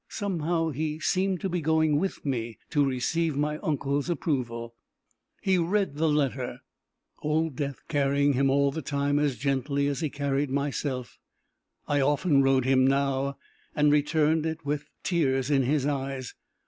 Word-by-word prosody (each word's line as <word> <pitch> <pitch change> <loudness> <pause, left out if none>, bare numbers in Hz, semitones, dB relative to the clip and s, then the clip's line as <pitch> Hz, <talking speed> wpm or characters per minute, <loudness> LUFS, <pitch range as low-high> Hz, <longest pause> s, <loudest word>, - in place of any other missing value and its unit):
Somehow 170 -4 -1
he 155 +2 -3
seemed 185 +1 0
to - - -1
be 175 -1 -1
going 160 -1 +2
with 195 -2 -3
me 120 -4 -2
to 145 -2 +3
receive 140 +4 0
my 150 +1 -1
uncle's 145 +1 -1
approval. 120 -9 -2 0.7
He 190 -2 +3
read 190 0 +1
the 160 +1 +2
letter, 135 -4 -1 0.6
old 155 -1 0
Death 140 -1 -4
carrying 140 -1 +2
him 135 +1 +2
all 140 +1 +3
the 160 - -4
time 145 +1 0
as 145 -3 +1
gently 140 +1 0
as 140 -1 -1
he 160 -3 -1
carried 140 0 -1
myself 135 -3 -3 0.7
I 145 -1 +2
often 145 +1 +3
rode 135 -2 +3
him 130 0 +4
now 140 0 0 0.4
and 150 0 +4
returned 155 +2 +2
it 160 -1 -5
with 145 +1 -2
the - - -35
tears 135 -6 +1
in 140 -2 +4
his 135 +2 +1
eyes. 135 -2 -3
145 Hz, 160 wpm, -27 LUFS, 135-155 Hz, 0.7 s, him